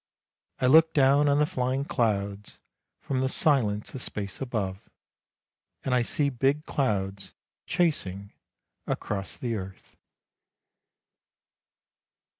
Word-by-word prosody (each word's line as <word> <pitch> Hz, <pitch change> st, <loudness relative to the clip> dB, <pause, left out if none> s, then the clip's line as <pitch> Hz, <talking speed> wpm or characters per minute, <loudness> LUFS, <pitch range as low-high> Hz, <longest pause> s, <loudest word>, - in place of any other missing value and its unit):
I -, -, +1 dB
look 160 Hz, +5 st, +6 dB
down 140 Hz, +1 st, +5 dB
on 140 Hz, -, +3 dB
the 150 Hz, -, +4 dB
flying 130 Hz, 0 st, -1 dB
clouds, 100 Hz, -5 st, -1 dB, 0.4 s
from 135 Hz, -2 st, -2 dB
the 130 Hz, 0 st, +1 dB
silence 115 Hz, -9 st, +1 dB
of 130 Hz, -, -5 dB
space 100 Hz, -2 st, -5 dB
above, 105 Hz, -7 st, -2 dB, 1.1 s
and 130 Hz, -, 0 dB
I 125 Hz, -, +4 dB
see 140 Hz, +4 st, 0 dB
big 135 Hz, +4 st, +1 dB
clouds 100 Hz, -7 st, -2 dB, 0.3 s
chasing 100 Hz, -, -1 dB, 0.5 s
across 100 Hz, -2 st, -3 dB
the 120 Hz, -2 st, -3 dB
earth." 95 Hz, -3 st, -8 dB
125 Hz, 105 wpm, -27 LUFS, 100-140 Hz, 1.1 s, look